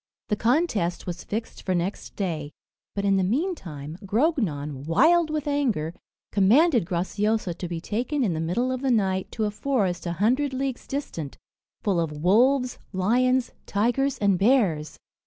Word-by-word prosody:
The 210 - +2
contest 225 - +1
was 175 -1 -5
fixed 225 +2 -5
for 185 - -1
next 175 +3 -3
day; 160 -7 -3 0.4
but 200 0 -1
in 195 -1 +3
the 190 - +2
meantime, 185 - -3
Grognon, 190 - 0
wild 325 - +4
with 305 -1 -2
anger, 240 - 0 0.4
commanded 235 - +4
Graciosa 200 +2 0
to 180 - -5
be 170 -1 -4
taken 250 - -1
in 195 -7 +1
the 160 - -3
middle 220 +11 0
of 255 0 -3
the 270 - 0
night 190 -5 +1
to 220 - -1
a 210 - -1
forest 205 -7 -1
a 170 - -1
hundred 255 - +1
leagues 265 -1 -3
distant, 170 - -5 0.5
full 195 -5 +1
of 165 -2 -1
wolves, 245 - +3
lions, 250 +7 +2 0.2
tigers, 245 +6 +1
and 200 -4 +2
bears. 195 - +2
210 Hz, 155 wpm, -25 LUFS, 175-260 Hz, 0.5 s, wild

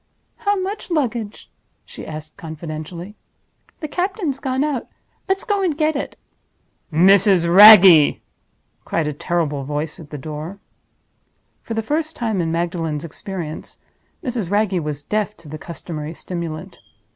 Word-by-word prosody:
"How 410 -1 0
much 390 +2 -4
luggage?" 240 - -2 0.3
she - - -10
asked, 155 0 -8
confidentially. 165 +2 -7 0.7
"The 310 - -3
captain's 355 -4 -2
gone 265 0 -1
out. 290 -5 -2 0.4
Let's 385 0 +1
go 405 -1 0
and 340 -6 0
get 310 -1 +1
it!" 280 - -4 0.7
"Mrs. 185 +1 +5
Wragge!" 185 -4 +9 0.6
cried 165 - -1
a 150 - -2
terrible 150 -2 -1
voice 150 +4 -4
at 155 -3 -11
the 150 - -6
door. 155 +6 -6 1.0
For 225 - -5
the 225 - -1
first 310 +6 -2
time 220 -6 -1
in 165 -1 -1
Magdalen's 165 -3 -2
experience, 165 -1 -7 0.5
Mrs. 240 - -3
Wragge 205 -2 +1
was 150 -2 -4
deaf 210 +4 -2
to 155 - -16
the 155 +1 -7
customary 160 -2 -7
stimulant. 170 +1 -6
185 Hz, 135 wpm, -20 LUFS, 155-245 Hz, 1.0 s, Wragge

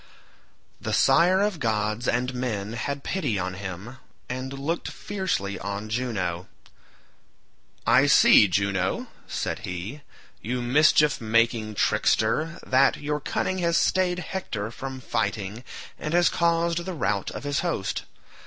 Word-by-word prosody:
The - - -3
sire 170 +8 +4
of 205 -5 0
gods 110 0 -1
and 125 +2 0
men 115 -4 -3
had 140 +4 -4
pity 145 - -1
on 90 0 -2
him, 100 +6 -7 0.3
and 130 +1 -4
looked 140 +5 -3
fiercely 185 - -3
on 100 +2 -5
Juno. 100 -8 -2 1.4
"I - - +5
see, 105 - +7
Juno," 95 0 -1 0.2
said - - -3
he, 95 +11 -6 0.4
"you 125 +3 -2
mischief 150 +4 +4
making 115 -1 +1
trickster, 115 +12 +1
that 130 +1 +4
your 150 0 -2
cunning 185 +6 -2
has 170 -1 +2
stayed 185 -1 +2
Hector 120 - -4
from 130 +1 -7
fighting 105 -1 -2 0.4
and 150 +2 -2
has 175 -1 +5
caused 170 0 +1
the 185 +1 -5
rout 105 - -1
of - - -7
his 145 0 -1
host. 165 - -2
125 Hz, 130 wpm, -25 LUFS, 105-155 Hz, 1.4 s, see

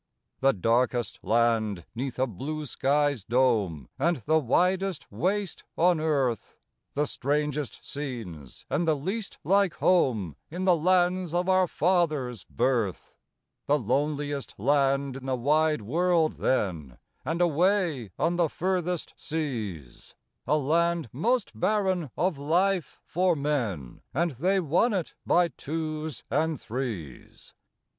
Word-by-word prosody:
The 135 0 +4
darkest 120 +2 +1
land 110 -6 +1
'neath 125 +1 -4
a 130 - +2
blue 145 - -5
sky's 145 -3 +1
dome, 105 - +1
And 170 -1 +2
the 160 +1 +4
widest 180 +6 +1
waste 195 +1 -1
on 175 0 +4
earth; 140 -7 0 0.4
The 145 +1 +2
strangest 145 -2 -2
scenes 115 - -7
and 165 +3 0
the 160 - +4
least 195 +9 -4
like 195 +1 +3
home 110 - +2
In 180 +4 -3
the 180 -2 +5
lands 180 +1 +2
of 180 +1 +1
our 185 -1 +4
fathers' 155 - 0
birth; 105 - -1 0.5
The 145 - +4
loneliest 145 +3 -1
land 135 +2 +1
in 135 0 -9
the 130 - +1
wide 150 +1 +2
world 165 - +1
then, 85 - -1 0.3
And 160 +5 -2
away 175 - +2
on 170 +1 +1
the 170 -3 +2
furthest 180 -1 -2
seas, 110 - -5 0.3
A 150 - +3
land 165 0 +1
most 235 - 0
barren 185 - 0
of 175 -4 0
life 175 +2 +1
for 180 0 +2
men 120 - -2
And 170 +3 +1
they 180 +10 +1
won 180 - +2
it 185 -5 -2
by 175 0 +4
twos 155 0 -4
and 155 0 +1
threes! 110 - -6
150 Hz, 125 wpm, -27 LUFS, 125-175 Hz, 0.5 s, the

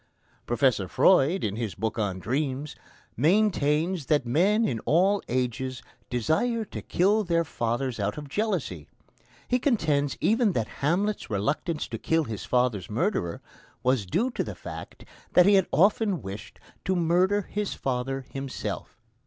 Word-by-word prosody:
Professor 120 -5 +2
Freud, 180 - +4
in 105 -1 -1
his 115 -4 -3
book 110 +2 -2
on 100 -3 -1
dreams, 135 +6 -2 0.4
maintains 165 - +2
that 145 -4 +2
men 195 - +3
in 115 - -1
all 190 - +2
ages 130 +1 -2 0.3
desire 215 - 0
to - - -7
kill 205 +5 +2
their 170 -3 +1
fathers 120 -3 -2
out 100 +4 -1
of 150 -1 -6
jealousy; 155 - -2 0.6
he 250 - +2
contends 155 - +1
even 225 -2 +2
that 115 -6 -1
Hamlet's 195 +9 0
reluctance 145 - -1
to 115 - -6
kill 160 0 +1
his 105 -7 -6
father's 120 -6 0
murderer 110 - -1 0.4
was 125 -6 +1
due 230 - 0
to - - -2
the - - -6
fact - - -9 0.3
that 180 - +7
he 205 - +6
had 190 -2 +4
often 195 - +2
wished 100 +2 -8 0.2
to 190 - 0
murder 180 +4 +2
his 205 +2 -3
father 135 +1 -2
himself. 135 -2 -5
145 Hz, 145 wpm, -27 LUFS, 120-190 Hz, 0.6 s, that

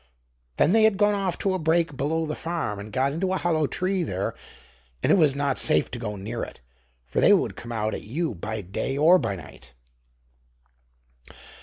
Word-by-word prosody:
Then 155 - +4
they 225 +2 +5
had 220 -2 +4
gone 205 0 +3
off 195 -4 -1
to 195 - 0
a 185 - -1
brake 160 -1 +1
below 160 +4 -1
the 155 -1 -3
farm 165 -12 -3
and 105 +1 -8
got 135 +5 0
into 185 +4 -1
a - - +1
hollow 160 -4 +1
tree 185 +4 -1
there, 100 - -2 0.7
and - - +3
it - - +7
was 155 -7 +4
not 140 -1 0
safe - - +2
to 120 - -5
go 105 -3 -4
near 110 +4 -5
it, - - -7 0.5
for 60 - -2
they - - +7
would - - +1
come 120 - -8
out 110 -1 -1
at - - -4
you 155 +6 -3
by 105 +4 -5
day 100 +8 -3
or 170 +5 +6
by 100 - -2
night. 65 -7 -13
150 Hz, 200 wpm, -25 LUFS, 110-175 Hz, 0.7 s, it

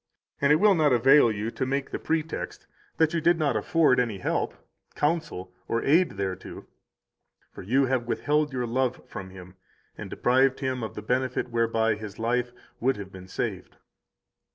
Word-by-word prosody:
And 140 +1 +4
it - - +7
will 205 +5 +5
not 155 -5 +3
avail 130 +1 +6
you 110 +2 -3
to 130 - -3
make 135 +1 -2
the - - -3
pretext 160 0 -3 0.3
that 160 0 +3
you 165 - 0
did 170 +1 +4
not 150 -3 +1
afford 155 -6 +3
any 115 -5 0
help, 90 - -2 0.4
counsel, 150 - -2
or 115 - -1
aid 165 +5 +3
thereto, 95 -1 -5 0.9
for - - -10
you 130 +8 +2
have 130 -2 -1
withheld 150 +4 0
your 125 -2 -2
love 125 +1 -1
from 95 -1 -8
him 95 0 -13 0.4
and - - -8
deprived 130 +2 +2
him 130 -2 -2
of 110 - -5
the 105 - -6
benefit 125 +2 -1
whereby 115 -1 +1
his 105 -1 -8
life 120 +2 0 0.3
would 130 +1 +1
have 100 -1 -8
been 95 -1 -11
saved. 95 - -4
125 Hz, 175 wpm, -26 LUFS, 110-145 Hz, 0.9 s, it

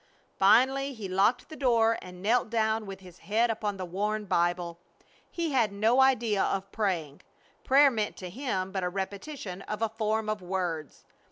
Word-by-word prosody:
Finally 265 +7 +4
he 215 -4 -6
locked 195 +7 +2
the 315 - -10
door 230 -5 +3
and 180 0 -11
knelt 225 +2 +2
down 220 -1 0
with 195 0 -8
his 180 -2 -14
head 225 +3 +1
upon 210 -2 -3
the 185 - -4
worn 210 +4 -2
Bible. 175 -1 0 0.5
He 335 -3 -2
had 235 -6 +2
no 220 +6 +3
idea 235 -6 +3
of 195 0 -1
praying. 175 -9 -2 0.4
Prayer 280 +1 +6
meant 215 -3 -2
to 185 - -7
him 195 -6 -3
but 190 -1 -2
a 180 - 0
repetition 195 +2 -5
of 210 +2 -4
a 225 - +1
form 220 0 -1
of 215 -2 -2
words. 175 -4 -4
210 Hz, 175 wpm, -28 LUFS, 190-235 Hz, 0.5 s, Prayer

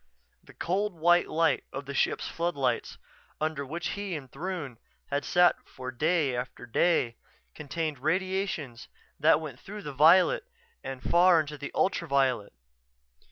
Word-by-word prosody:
The - - -17
cold 195 +2 -1
white 175 +2 +4
light 165 +1 +2
of 140 +1 -6
the 140 - -6
ship's - - 0
floodlights, 140 -8 -1 0.4
under 155 -2 -1
which 165 +6 -4
he 200 -3 -4
and 135 -4 -8
Throon 155 -6 -5 0.3
had 140 0 0
sat 175 0 +4
for 130 0 -7
day 150 0 +1
after 125 0 -5
day, 120 -1 +1 0.4
contained 150 -1 -4
radiations 185 - -2 0.3
that 155 +2 +5
went 150 -6 -8
through 205 +1 -9
the 145 -2 -6
violet 180 - +5 0.4
and 130 -1 -6
far 175 0 +5
into 150 -1 -3
the 145 -1 -7
ultraviolet. 135 - +1
155 Hz, 140 wpm, -28 LUFS, 135-175 Hz, 0.4 s, that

